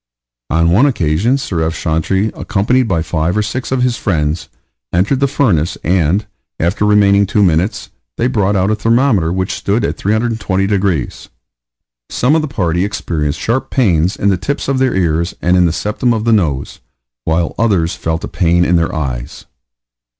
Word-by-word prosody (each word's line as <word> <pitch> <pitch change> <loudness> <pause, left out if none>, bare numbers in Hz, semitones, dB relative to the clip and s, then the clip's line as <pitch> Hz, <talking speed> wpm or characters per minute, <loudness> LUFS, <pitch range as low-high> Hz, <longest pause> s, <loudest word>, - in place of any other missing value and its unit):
On 85 +1 +2
one 115 +11 +4
occasion 100 - +1
Sir 90 -11 -3
F. 80 +1 -1
Chantrey, 95 +6 0
accompanied 115 +5 0
by 85 -6 0
five 80 +3 -1
or 105 - +2
six 125 +6 -4
of 130 -1 +1
his 125 -2 0
friends, 80 -3 -1 0.4
entered 100 +10 +1
the 140 - +2
furnace, 105 - 0
and, 90 +3 +1 0.3
after 90 +5 0
remaining 100 -1 +4
two 105 +1 +2
minutes, 90 +4 0 0.3
they 115 - 0
brought 105 -5 +1
out 95 +2 +1
a - - +2
thermometer 115 -6 +2
which 95 +1 -2
stood 105 +2 -1
at - - -3
320 110 -2 0
degrees. 95 - -1 0.8
Some 125 +5 +1
of 160 - +2
the 155 - -3
party 90 - -1
experienced 85 -7 -2
sharp 120 +4 -1
pains 90 - +1
in 100 - 0
the 95 - +2
tips 140 - -3
of 135 -1 0
their 130 0 +1
ears, 85 -1 0
and 90 +1 +2
in 90 -1 +4
the - - 0
septum 105 +7 -1
of 110 - -2
the 115 0 +2
nose, 75 -10 -1 0.4
while 85 +1 0
others 95 -7 +1
felt 80 +1 -3
a - - -3
pain 85 -1 +1
in 90 - +3
their 80 0 -1
eyes. 65 -6 -5
95 Hz, 180 wpm, -15 LUFS, 85-110 Hz, 0.8 s, one